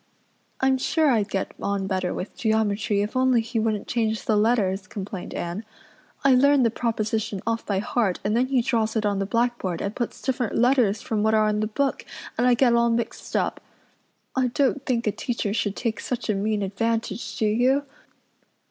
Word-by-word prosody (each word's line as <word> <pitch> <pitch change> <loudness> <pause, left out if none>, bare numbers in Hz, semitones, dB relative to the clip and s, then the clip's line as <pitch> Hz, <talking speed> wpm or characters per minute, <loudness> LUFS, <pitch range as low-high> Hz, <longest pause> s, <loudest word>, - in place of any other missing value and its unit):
"I'm 265 0 +3
sure 310 +2 +2
I'd 215 -4 +1
get 195 - -2
on 200 -1 -1
better 185 -2 -1
with 185 - -5
geometry 215 -2 +1
if 210 - -5
only 255 -1 +4
he 225 +1 -2
wouldn't 215 -2 -1
change 220 -2 -1
the 215 - +2
letters," 205 -3 +1
complained 195 -2 -6
Anne. 175 +5 -4 0.6
"I 275 -1 +6
learn 280 +1 +5
the 230 - +3
proposition 220 -3 -1
off 230 0 -2
by 200 - 0
heart 210 -2 0
and 210 +2 0
then 250 +2 +2
he 260 -3 +2
draws 225 -3 0
it 220 -1 0
on 200 -1 +1
the 195 - -1
blackboard 230 -6 0
and 200 +2 -3
puts 240 - -3
different 250 -4 -1
letters 240 -4 +3
from 215 -2 -1
what 220 +1 +3
are 215 0 +4
in 210 0 0
the 215 - 0
book 275 +6 -1 0.3
and 245 +2 +2
I 245 - +5
get 240 -1 +4
all 235 0 +3
mixed 235 0 -3
up. - - 0 0.7
I 260 -1 +2
don't 275 +2 +1
think 235 -2 0
a 210 - +2
teacher 220 -2 -2
should 205 -2 -1
take 230 -2 -2
such 245 -3 -2
a - - +1
mean 205 +1 0
advantage, 225 +2 -2
do 220 - +1
you? 250 +6 +2
225 Hz, 195 wpm, -24 LUFS, 205-245 Hz, 0.7 s, I